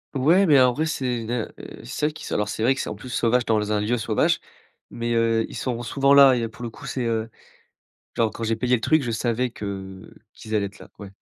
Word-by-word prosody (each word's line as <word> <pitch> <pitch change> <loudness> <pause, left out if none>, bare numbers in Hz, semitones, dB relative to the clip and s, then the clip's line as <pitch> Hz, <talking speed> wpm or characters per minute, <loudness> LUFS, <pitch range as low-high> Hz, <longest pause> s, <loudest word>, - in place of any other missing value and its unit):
Ouais, 165 +9 +4
mais 145 -6 +6
en 125 -1 +4
vrai 155 +5 -1
c'est 125 -7 -2
une 110 - -5
heu 120 -3 -2 0.3
c'est - - -3
vrai 150 - 0
qu'ils - - -9
sont - - -3
alors 105 - 0
c'est 110 - -5
vrai 130 +4 +3
que - - -3
c'est, - - -5
en - - -4
plus, 130 - -11
sauvage 120 0 +1
dans 105 -1 0
un 105 - +1
lieu 115 +4 0
sauvage, 110 - +1 0.5
mais 120 0 -3
heu, 115 -1 +2
ils - - -10
sont 120 -2 -3
souvent 140 +4 +2
là. 140 -2 +8
Et - - -1
il - - -1
y - - -2
a 115 - -3
pour 115 - -15
le 120 - -3
coup, - - -13
c'est 130 - -3
heu, 115 -1 -2 0.8
genre 115 -1 +1
quand 115 - -6
j'ai 115 0 0
payé 125 +2 +1
le 120 - -1
truc, 155 -1 +3
je 120 - -3
savais 120 +2 0
que 95 -4 -8 0.2
qu'ils 110 - -7
allaient 105 -2 +1
être 100 - -12
là, - - -13
ouais. 100 -2 -9
115 Hz, 280 wpm, -23 LUFS, 110-130 Hz, 0.8 s, là